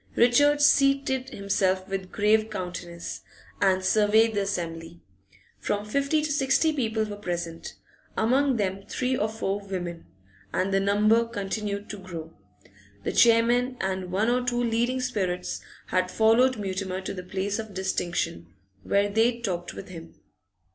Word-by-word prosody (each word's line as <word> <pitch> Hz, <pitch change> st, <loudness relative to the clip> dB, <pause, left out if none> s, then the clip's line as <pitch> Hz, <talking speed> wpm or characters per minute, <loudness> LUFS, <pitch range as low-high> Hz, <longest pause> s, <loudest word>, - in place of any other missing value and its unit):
Richard 290 Hz, +5 st, +4 dB
seated 275 Hz, -2 st, +3 dB
himself 195 Hz, -4 st, 0 dB
with 195 Hz, -1 st, -4 dB
grave 215 Hz, +1 st, +2 dB
countenance, 175 Hz, -2 st, -6 dB, 0.4 s
and 190 Hz, -1 st, +3 dB
surveyed 220 Hz, +2 st, +4 dB
the 205 Hz, -, 0 dB
assembly; 170 Hz, -3 st, -4 dB, 0.6 s
from 205 Hz, 0 st, -2 dB
fifty 280 Hz, +7 st, +1 dB
to 305 Hz, -, -1 dB
sixty 290 Hz, +3 st, +2 dB
people 220 Hz, -6 st, 0 dB
were 210 Hz, -1 st, -5 dB
present, 175 Hz, -4 st, -5 dB, 0.4 s
among 260 Hz, +3 st, +2 dB
them 195 Hz, -2 st, -1 dB
three 255 Hz, 0 st, -1 dB
or 215 Hz, -3 st, 0 dB
four 205 Hz, -2 st, -2 dB
women, 180 Hz, -, -6 dB, 0.4 s
and 195 Hz, +1 st, 0 dB
the 195 Hz, -, +4 dB
number 210 Hz, +3 st, +3 dB
continued 205 Hz, -1 st, -4 dB
to 210 Hz, -, -7 dB
grow. 165 Hz, -4 st, -8 dB, 0.7 s
The -, -, -1 dB
chairman 240 Hz, +2 st, +4 dB
and 190 Hz, -1 st, -2 dB
one 210 Hz, +5 st, +1 dB
or 250 Hz, 0 st, +1 dB
two 245 Hz, 0 st, 0 dB
leading 240 Hz, +2 st, 0 dB
spirits 190 Hz, -8 st, -2 dB, 0.3 s
had 185 Hz, 0 st, +1 dB
followed 230 Hz, +5 st, +4 dB
Mutimer 190 Hz, -2 st, -3 dB
to -, -, -5 dB
the 185 Hz, -, -6 dB
place 190 Hz, +3 st, -3 dB
of 220 Hz, -3 st, -7 dB
distinction, 175 Hz, -, -2 dB, 0.3 s
where 200 Hz, -, +2 dB
they 225 Hz, +3 st, +2 dB
talked 180 Hz, -6 st, -3 dB
with 195 Hz, -, -9 dB
him. 165 Hz, -2 st, -10 dB
205 Hz, 145 wpm, -26 LUFS, 185-235 Hz, 0.7 s, Richard